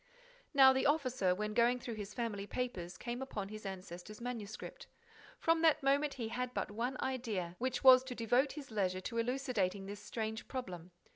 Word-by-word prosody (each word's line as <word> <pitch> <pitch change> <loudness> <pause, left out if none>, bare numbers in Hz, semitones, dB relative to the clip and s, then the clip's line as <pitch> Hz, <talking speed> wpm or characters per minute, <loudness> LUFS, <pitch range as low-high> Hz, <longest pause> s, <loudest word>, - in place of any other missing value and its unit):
Now 265 -2 +8
the 265 - +2
officer, 255 - +2
when 210 +2 -2
going 240 +2 +3
through 240 -1 -5
his 210 -1 -7
family 215 -5 -3
papers, 180 -9 -4
came 240 +1 -4
upon 205 -7 -4
his 215 -1 -7
ancestor's 190 +2 -8
manuscript. 230 -3 -6 0.5
From 330 0 +2
that 320 -3 +4
moment, 280 +1 +2
he 230 -4 -3
had 250 +2 -3
but - - -2
one 240 +5 -2
idea, 220 -10 -2
which 255 +2 -1
was 260 -1 +9
to 255 -1 -5
devote 245 +5 +2
his 285 -5 -9
leisure 185 -3 0
to 230 +4 -3
elucidating 230 -6 0
this 205 +1 -7
strange 220 +1 -4
problem. 185 -10 -6
235 Hz, 180 wpm, -35 LUFS, 205-260 Hz, 0.5 s, was